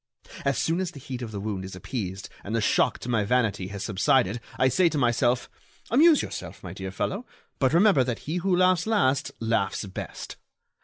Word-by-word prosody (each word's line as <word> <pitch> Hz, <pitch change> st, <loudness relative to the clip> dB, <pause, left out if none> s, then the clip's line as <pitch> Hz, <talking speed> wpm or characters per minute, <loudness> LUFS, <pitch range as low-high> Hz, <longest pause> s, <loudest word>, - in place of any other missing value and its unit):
As 140 Hz, -1 st, +1 dB
soon 165 Hz, +2 st, +1 dB
as 185 Hz, -2 st, -1 dB
the 150 Hz, -, -11 dB
heat 130 Hz, -2 st, -6 dB
of 115 Hz, -3 st, -5 dB
the 100 Hz, -, -5 dB
wound 100 Hz, -2 st, -3 dB
is 95 Hz, 0 st, -7 dB
appeased 95 Hz, -2 st, -5 dB, 0.2 s
and 105 Hz, +3 st, -3 dB
the -, -, +2 dB
shock 105 Hz, -, +2 dB
to -, -, -9 dB
my 115 Hz, -4 st, +1 dB
vanity 110 Hz, -4 st, +1 dB
has 100 Hz, 0 st, -6 dB
subsided 105 Hz, +2 st, +2 dB, 0.2 s
I 130 Hz, -, +4 dB
say 170 Hz, +7 st, +3 dB
to 155 Hz, -, -3 dB
myself: 120 Hz, -1 st, +2 dB, 0.4 s
'Amuse 300 Hz, +5 st, +6 dB
yourself, -, -, -7 dB
my 90 Hz, -2 st, -7 dB
dear 95 Hz, 0 st, -6 dB
fellow, 190 Hz, -, -3 dB, 0.4 s
but 130 Hz, -2 st, +3 dB
remember 170 Hz, -4 st, +5 dB
that 120 Hz, -2 st, -2 dB
he 160 Hz, +4 st, -2 dB
who 180 Hz, 0 st, +1 dB
laughs 185 Hz, 0 st, +3 dB
last 140 Hz, -11 st, +2 dB
laughs 110 Hz, -3 st, 0 dB
best. 95 Hz, -, -7 dB
125 Hz, 200 wpm, -26 LUFS, 100-165 Hz, 0.4 s, Amuse